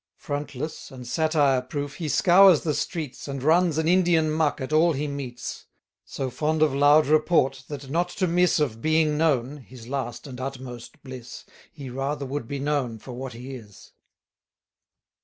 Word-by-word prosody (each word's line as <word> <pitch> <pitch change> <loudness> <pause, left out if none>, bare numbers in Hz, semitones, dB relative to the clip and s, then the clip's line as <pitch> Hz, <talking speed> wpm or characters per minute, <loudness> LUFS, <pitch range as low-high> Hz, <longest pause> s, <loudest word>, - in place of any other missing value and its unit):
Frontless, 145 +1 -5
and 130 -3 -10
satire 145 -1 +2
proof, 140 +2 -5
he 160 -3 -3
scours 180 +3 +6
the 155 - -1
streets, 150 -4 -4
And 135 -2 -5
runs 165 +1 +3
an 160 0 0
Indian 170 -3 +3
muck 155 -2 +1
at 130 +3 -4
all 165 +2 +4
he 150 +2 -2
meets. 135 -4 -6 0.4
So 130 -2 -4
fond 155 +4 +1
of 150 -3 +2
loud 145 +2 +5
report, 150 -3 +2
that 145 -2 -7
not 170 +6 0
to 185 - -1
miss 180 +1 +3
1190 150 - +3
Of 115 - -16
being 155 0 +2
known 145 -3 +1
(his 125 -2 -13
last 130 -3 -4
and 130 -3 -8
utmost 130 -3 -8
bliss) 130 -3 -9 0.3
He 140 -5 -9
rather 140 +2 -3
would 135 -3 -4
be 140 - -4
known 140 -5 -1
for 125 - -11
what 130 0 -6
he 125 +3 -8
is. 105 -6 -12
145 Hz, 175 wpm, -25 LUFS, 130-155 Hz, 0.4 s, scours